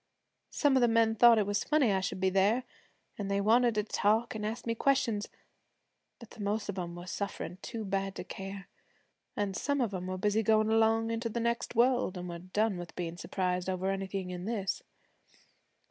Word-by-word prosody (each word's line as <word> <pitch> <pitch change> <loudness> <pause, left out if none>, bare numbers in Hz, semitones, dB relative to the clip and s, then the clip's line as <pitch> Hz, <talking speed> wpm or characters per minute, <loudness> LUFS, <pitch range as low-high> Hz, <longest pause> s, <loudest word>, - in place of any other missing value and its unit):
Some 290 -3 +2
of 260 - +4
the 240 - +5
men 225 -1 +3
thought 235 +1 +7
it 210 - +2
was 205 +1 0
funny 300 -7 +3
I 190 - +2
should 185 0 -3
be 190 0 +2
there, 200 +6 +3 0.6
an' 205 - -2
they 200 0 0
wanted 230 +3 +4
to 210 - +1
talk 220 +2 +1
an' 215 - -4
ask 220 +3 -4
me 230 - 0
questions; 230 -4 +1 0.9
but 235 - -14
the - - -14
most 205 +1 -1
of 195 -1 -3
'em 170 -1 -5
were 175 0 -8
sufferin' 185 -1 -5
too 225 -2 -5
bad 195 0 -2
to - - -5
care, 195 +1 -7 0.7
an' 205 -2 -1
some 285 +8 -1
of 230 -6 0
'em 180 -1 -4
were 185 0 -3
busy 210 +3 +1
goin' 220 0 +3
along 225 0 +3
into 230 +1 -2
the 235 - -3
next 235 +1 -1
world, 245 -5 +2
an' 180 0 -5
were 170 0 -6
done 195 +3 0
with 175 -1 -9
bein' 170 -1 -4
surprised 180 0 -2
over 190 +1 -1
anything 195 -1 -3
in 180 0 -6
this. 205 -3 -2
205 Hz, 205 wpm, -31 LUFS, 190-230 Hz, 0.9 s, thought